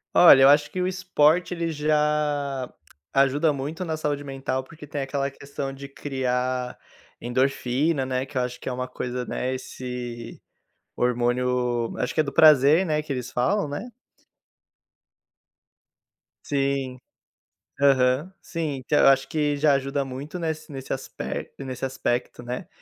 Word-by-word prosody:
Olha, 155 -6 +9
eu 135 - +8
acho 145 +1 +4
que 185 - -2
o 180 - +1
esporte 180 -2 +2
ele 170 -1 -2
já 150 -3 0 0.4
ajuda 140 +3 +3
muito 150 +6 -4
na 160 -2 -2
saúde 145 -2 -2
mental, 135 -1 -3
porque 150 +1 -13
tem 145 0 -3
aquela 135 0 -1
questão 140 0 -6
de 140 +1 -9
criar 130 -2 -2 0.5
endorfina, 130 +3 0
né. 130 0 -1
Que 135 - -16
eu - - +3
acho 125 0 -4
que - - -10
é - - 0
uma 125 0 -3
coisa 125 0 -4
né, 130 +1 -2
esse 125 -2 -6 0.6
hormônio, 125 -1 0
acho 125 - -2
que - - +2
é - - +5
do 140 -2 -5
prazer, 155 +3 +6
né, 155 -1 0
que 150 - -5
eles 125 -2 -4
falam, 170 +9 +1
né? 145 +11 -5 2.6
Sim. 135 -2 -1 0.8
Aham, 135 +3 +3
sim. 165 -5 -3
Então, 150 - +2
eu - - +6
acho 135 0 +4
que 150 -3 0
já 145 0 +4
ajuda 140 0 0
muito 135 +6 -6
nesse 160 -2 -4
nesse 135 -2 -5
aspect 135 - -5
nesse 130 0 -4
aspecto, 125 -2 -2
né. 125 +8 -5
135 Hz, 150 wpm, -25 LUFS, 125-150 Hz, 2.6 s, Olha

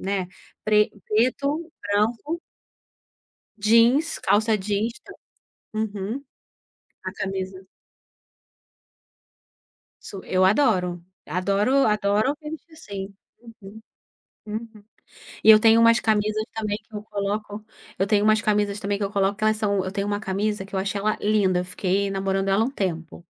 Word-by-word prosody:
né, 190 -1 -2 0.4
pre 210 0 +3 0.2
preto, 280 +9 0
branco 225 +11 -1 1.2
jeans, 230 +9 +3
calça 215 +2 +2
jeans 205 +3 -1
tam 400 - -12 0.6
Uhum. 215 +3 -3 0.8
A - - -4
camisa 190 -1 -4 2.4
Su 195 - -8
eu 185 0 +2
adoro. 185 -6 +2 0.3
Adoro 200 +9 +2
adoro 210 +5 +1
me 300 - -7
vestir 320 +1 -10
assim. 200 -10 -7 0.5
Uhum. 200 +3 -11 0.6
Uhum. 220 0 -7 0.6
E 220 - +9
eu 215 - +10
tenho 225 0 +6
umas 230 0 +5
camisas 215 0 +1
também 210 -2 -2
que 220 - -19
eu 210 - -5
coloco 205 0 -4 0.4
eu 195 - +1
tenho 205 0 +2
umas 215 +1 +4
camisas 210 -1 0
também 200 0 -1
que 200 - -2
eu 195 - -3
coloco 200 0 +1
que 215 - -3
elas 215 0 +3
são 200 -3 0
eu 185 - -4
tenho 200 0 -2
uma 205 0 -1
camisa 210 0 -2
que 195 - -12
eu - - 0
achei 195 +1 -2
ela 215 +1 0
linda, 200 -4 +2
fiquei 190 +2 -1
namorando 195 0 -1
ela 195 +3 +3
um 250 - -2
tempo. 170 - -4
210 Hz, 140 wpm, -24 LUFS, 195-220 Hz, 2.4 s, eu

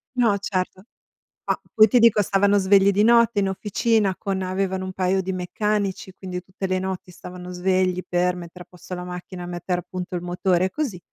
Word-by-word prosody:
No, 235 -5 +3
certo. 185 -1 -3 0.6
Ma - - +1 0.2
poi 215 0 +7
ti 245 +4 +4
dico, 225 -2 +5
stavano 200 +1 +3
svegli 195 0 +5
di 200 +1 +2
notte 235 -1 +4
in 195 - +1
officina 205 +1 +1
con 195 -1 -2
avevano 185 0 -2
un 185 - -4
paio 190 +1 +1
di 190 - -3
meccanici, 195 +1 -2
quindi 180 -1 -6
tutte 190 +1 -6
le 185 0 0
notti 185 -1 -5
stavano 180 0 -9
svegli 185 0 +1
per 180 0 +1
mettere 175 0 -10
a - - -51
posto 180 0 -9
la 180 - -6
macchina, 180 0 -7
mettere 175 +1 -3
appunto 180 +1 -6
il 175 - -3
motore, 180 0 +1
e - - -1
così. 270 - -3
185 Hz, 195 wpm, -23 LUFS, 180-200 Hz, 0.6 s, poi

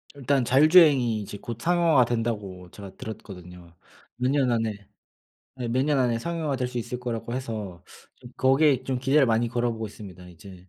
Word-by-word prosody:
일단 140 -1 0
자율주행이 135 -3 +5
이제 100 0 -8
곧 115 +2 -7
상용화가 165 -5 +3
된다고 105 -6 -4
제가 100 -2 -11
들었거든요. 90 -5 -10 0.4
몇 125 +2 -1
년 135 -3 +1
안에 115 -2 0 0.9
예. 120 - -3
몇 130 +3 +1
년 150 -1 +1
안에 120 -3 +1
상용화될 150 -3 -3
수 125 -1 -5
있을 120 +1 -5
거라고 120 -1 -5
해서 110 -9 -6 0.3
좀 120 -1 -14
거기에 135 0 +3
좀 130 -1 -2
기대를 135 +2 +3
많이 115 0 +1
걸어보고 115 -1 -2
있습니다. 95 -4 -12
이제 90 +1 -14
120 Hz, 365 characters per minute, -25 LUFS, 105-135 Hz, 0.9 s, 자율주행이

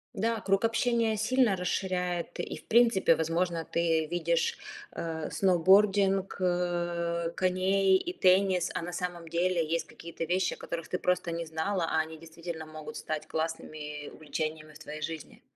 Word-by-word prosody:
Да, 225 +2 0
круг 195 +1 +1
общения 230 -1 +2
сильно 230 -1 +3
расширяет. 180 -1 -2
И - - -3
в - - -15
принципе, 230 -7 +5
возможно, 165 +1 0
ты 165 -2 +1
видишь, 170 0 0 0.3
э 160 -2 -4
сноубординг, 195 +1 +4
э 175 -2 0
коней 190 +1 +3
и 350 - -4
теннис. 185 - +3
А - - -2
на 175 +1 -5
самом 175 -2 -4
деле 170 0 +1
есть 165 +1 -1
какие-то 170 0 -7
вещи, 180 +2 +1
о - - -10
которых 170 -1 -5
ты 180 - -2
просто 180 -1 0
не 170 0 -3
знала. 165 +3 -1
А - - 0
они 160 0 -3
действительно 165 0 -7
могут 155 -1 -8
стать 155 -1 -4
классными 155 -2 -4
увлечениями 155 0 -5
в 150 - -14
твоей 155 -1 -8
жизни. 160 0 -6
175 Hz, 155 wpm, -29 LUFS, 160-190 Hz, 0.3 s, принципе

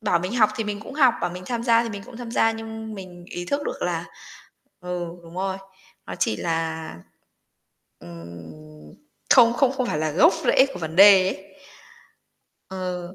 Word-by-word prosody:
Bảo 180 -6 +1
mình 185 +7 -4
học 215 -3 +4
thì 225 - -2
mình 210 0 -4
cũng 245 - -10
học, 265 -5 +4
bảo - - -1
mình 180 +1 -8
tham 235 -2 -3
gia 230 -1 +4
thì 230 - -4
mình 200 -2 -7
cũng 235 - -12
tham 240 -2 -7
gia 225 -1 +2
nhưng 220 0 -7
mình 180 -3 -10
ý 175 - -5
thức 285 +10 -2
được - - -5
là - - -2 0.8
ừ, 180 -1 -4 0.2
đúng 165 +1 -13
rồi, 190 0 -2 0.5
nó - - -6
chỉ 110 - +1
là, 160 -1 -2 1.1
ừm, 80 -3 -12 0.4
không 235 0 +7
không 260 +2 +2
không 260 -2 -2
phải 155 - -2
là 155 0 -1
gốc 290 - +5
rễ 265 +2 +5
của - - -6
vấn 160 0 -5
đề 195 -1 +8
ấy. 190 0 -8 1.1
Ờ. 180 -1 -5
190 Hz, 185 wpm, -23 LUFS, 165-225 Hz, 1.1 s, đề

